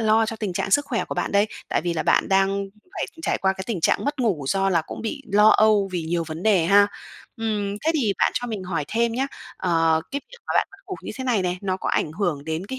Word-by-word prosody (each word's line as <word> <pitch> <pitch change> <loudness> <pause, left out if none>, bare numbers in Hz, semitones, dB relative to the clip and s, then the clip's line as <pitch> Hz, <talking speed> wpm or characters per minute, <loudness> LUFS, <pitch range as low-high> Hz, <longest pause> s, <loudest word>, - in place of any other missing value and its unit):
lo 220 0 +3
cho 225 0 -4
tình 210 -4 -3
trạng 185 - -2
sức 285 +8 +4
khỏe 235 -5 -1
của - - -5
bạn - - -2
đây. 200 +1 +4 0.2
Tại - - +1
vì 175 - 0
là 160 - -1
bạn - - +2
đang 195 0 +4 0.4
phải - - -3 0.2
trải - - 0
qua 190 0 +2
cái 190 0 -7
tình 220 -7 -2
trạng - - +2
mất 285 0 -2
ngủ 195 - 0
do 195 +3 +2
là 170 -3 +2
cũng - - -7
bị 275 +5 -4
lo 210 +1 +7
âu 215 -2 +4
vì 175 -2 -1
nhiều 165 +1 -1
vấn 160 +1 -6
đề 195 -6 +4
ha. 200 +2 +6 0.5
Ừm, 210 -3 -2
thế 320 - +3
thì 235 -10 +2
bạn - - +3
cho 245 - -1
mình 215 -5 -4
hỏi 165 -5 -2
thêm 235 +1 +1
nhá. 265 +3 0 0.3
Ờ, 165 -1 +2
cái 280 - -2
việc - - -13
mà - - -2
bạn - - +2
mất 395 - -16
ngủ 380 - -4
như - - -6
thế 260 - -4
này 235 -6 +1
này, 180 0 -1
nó 185 -1 -1
có - - -4
ảnh 150 - 0
hưởng 165 -6 -2
đến 160 +4 -3
cái 260 +5 -5
200 Hz, 275 wpm, -23 LUFS, 175-225 Hz, 0.5 s, lo